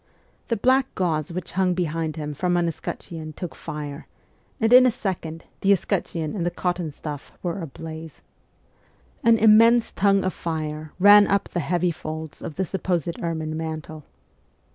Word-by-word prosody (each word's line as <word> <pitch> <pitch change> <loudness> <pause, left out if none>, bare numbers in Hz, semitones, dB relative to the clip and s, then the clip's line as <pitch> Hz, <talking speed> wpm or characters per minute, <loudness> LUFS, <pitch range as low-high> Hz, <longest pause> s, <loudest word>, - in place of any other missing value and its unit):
The 230 - 0
black 260 +4 +3
gauze 160 -4 -1
which 180 0 -5
hung 185 -1 +1
behind 165 -2 -2
him 150 -2 -4
from 175 +4 0
an 175 -1 +2
escutcheon 160 -1 -6
took 175 +2 -6
fire, 145 0 -7 0.5
and 225 0 +3
in 255 0 +9
a - - +5
second 180 -8 -4
the 195 - +3
escutcheon 165 -4 0
and 180 - -2
the 175 - +1
cotton 175 -2 -2
stuff 145 -1 -7
were 180 +2 -2
ablaze. 160 +1 -8 1.0
An 230 -1 +6
immense 225 +2 +6
tongue 195 -1 +3
of 185 - -1
fire 155 -2 -4
ran 205 +2 +8
up 200 0 +1
the 175 - -2
heavy 175 +2 +1
folds 155 -1 -7
of 150 - -6
the 190 - -1
supposed 175 -3 -2
ermine 160 -2 -2
mantle. 155 -1 -5
170 Hz, 160 wpm, -24 LUFS, 155-195 Hz, 1.0 s, in